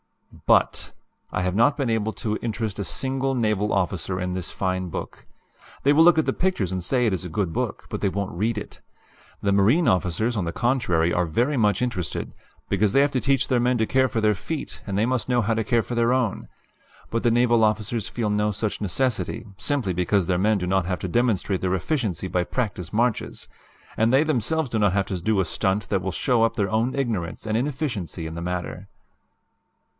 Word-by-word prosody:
"B - - +7
U - - +8
T, - - -5 0.4
I 90 - -1
have 90 0 0
not 140 +7 +4
been 135 -5 0
able 110 -1 0
to 110 -1 -2
interest 110 -3 -3
a - - -1
single 135 +8 -2
naval 105 -3 +1
officer 95 -1 -1
in 90 -1 -2
this 90 -2 -4
fine 95 -1 -2
book. - - -7 0.6
They 140 - +5
will 160 +2 +6
look 175 -1 +6
at 160 - +3
the - - +1
pictures 175 - 0
and 95 -1 -3
say 125 +6 +1
it 110 - +2
is 95 - -2
a 90 - -6
good 90 0 -1
book, - - -3
but - - -4
they 100 - +2
won't 100 0 -3
read 110 +6 -1
it. 105 - -7 0.6
The 100 - +1
marine 110 - +4
officers, 95 +6 +1
on 100 -5 -1
the 85 - -2
contrary, 90 -9 +1
are 90 - +2
very 120 - 0
much 105 -2 +2
interested, 110 -10 -3 0.4
because 100 0 +2
they 135 - +5
have 140 0 +2
to 130 -3 0
teach 135 -1 +2
their 125 - +2
men 125 +1 +2
to 110 - +2
care 130 +3 +3
for 120 -2 -2
their 110 -1 +3
feet 150 - -5
and 100 -1 -2
they 105 - +3
must 125 0 -1
know 125 -1 +3
how 115 +1 +1
to 110 0 0
care 115 +2 +2
for - - -6
their 120 +1 +3
own. 125 -6 -1 0.6
But 115 - 0
the 120 - +3
naval 120 -1 +3
officers 110 0 0
feel 110 -3 -2
no 105 0 +1
such 105 +1 -3
necessity, 110 0 -1
simply 130 -10 0
because 90 +2 +1
their 90 0 0
men 105 +2 +3
do 90 - -2
not 95 -1 +1
have 90 -1 -2
to - - -4
demonstrate 105 -2 +1
their 95 0 +1
efficiency 100 - -2
by 90 -1 0
practice 95 -9 -3
marches, 120 +2 -1 0.5
and 110 +1 +2
they 135 +3 +5
themselves 155 +1 0
do 110 - 0
not 100 -3 +3
have 100 -1 +1
to 95 -3 -3
do 105 +2 +1
a 95 - +2
stunt 95 +5 -1
that 95 -2 +1
will 95 - -2
show 120 +5 +1
up 115 - +1
their 100 -3 0
own 115 +4 +1
ignorance 110 -12 -2
and 110 0 -1
inefficiency 120 - -2
in 80 - -5
the 85 - -5
matter. 90 +1 -4
110 Hz, 225 wpm, -24 LUFS, 95-125 Hz, 0.6 s, U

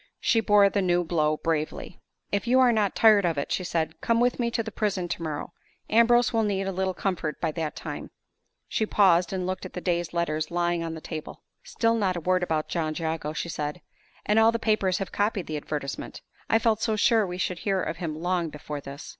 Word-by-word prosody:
She 230 - +2
bore 205 -2 +5
the 200 0 0
new 175 -1 +2
blow 155 -2 +1
bravely. 160 +2 -3 0.3
"If 200 +2 -1
you 255 +2 +4
are 255 -2 +6
not 210 -3 +1
tired 215 -3 +6
of 170 -4 0
it," 140 - -3
she 185 - 0
said, 165 -3 -2
"come 230 0 +2
with 245 +1 +2
me 235 -1 +1
to 230 -1 -1
the 220 - -6
prison 200 -4 -1
tomorrow. 160 -3 -4 0.4
Ambrose 240 +2 +4
will 225 - +3
need 200 -2 0
a 195 - -1
little 190 0 -1
comfort 170 -6 -2
by 160 - -1
that 155 -1 -4
time." - - -6 0.6
She 220 - -1
paused, 180 -5 +4
and 185 -2 -2
looked 185 +1 -3
at 185 - -8
the - - -4
day's 175 -2 -1
letters 155 -2 -1
lying 175 0 0
on 165 0 -4
the 160 - -8
table. 155 -2 -7 0.2
"Still 230 -1 +1
not 200 -5 +1
a - - -4
word 185 +2 +1
about 160 -3 -1
John 155 -2 -2
Jago," 160 -2 -2
she 155 - -3
said. 150 0 -4 0.5
"And 210 +1 +3
all 225 +1 +6
the 230 - -1
papers 215 -5 +1
have 195 - -4
copied 205 -3 0
the 155 - -5
advertisement. 145 -1 -5 0.3
I 225 - +5
felt 225 -1 +1
so 220 - +1
sure 220 -1 +3
we 180 0 -5
should 180 -1 -2
hear 195 -2 0
of 165 -3 -3
him 165 -4 -4
long 175 -1 0
before 150 -1 -7
this!" 140 +2 -9
180 Hz, 225 wpm, -26 LUFS, 160-210 Hz, 0.6 s, are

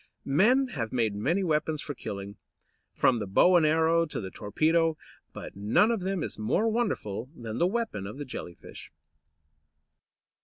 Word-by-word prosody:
Men 240 - +3
have 115 - -4
made 115 -4 0
many 160 - 0
weapons 155 -2 0
for 145 - -5
killing, 100 -5 -7 0.5
from 125 -3 +2
the 105 - -4
bow 180 - +4
and 165 -3 +5
arrow 165 +2 +3
to - - -5
the 95 -3 -6
torpedo, 160 +9 +1 0.3
but - - -9
none 105 - +3
of 225 -4 -1
them 190 -2 -2
is - - -6
more 110 - +1
wonderful 130 - -2
than 115 -2 -6
the 175 - +4
weapon 200 - -3
of 105 - -8
the 145 - -5
Jelly 90 -9 -7
fish. - - -12
150 Hz, 165 wpm, -28 LUFS, 110-180 Hz, 0.5 s, and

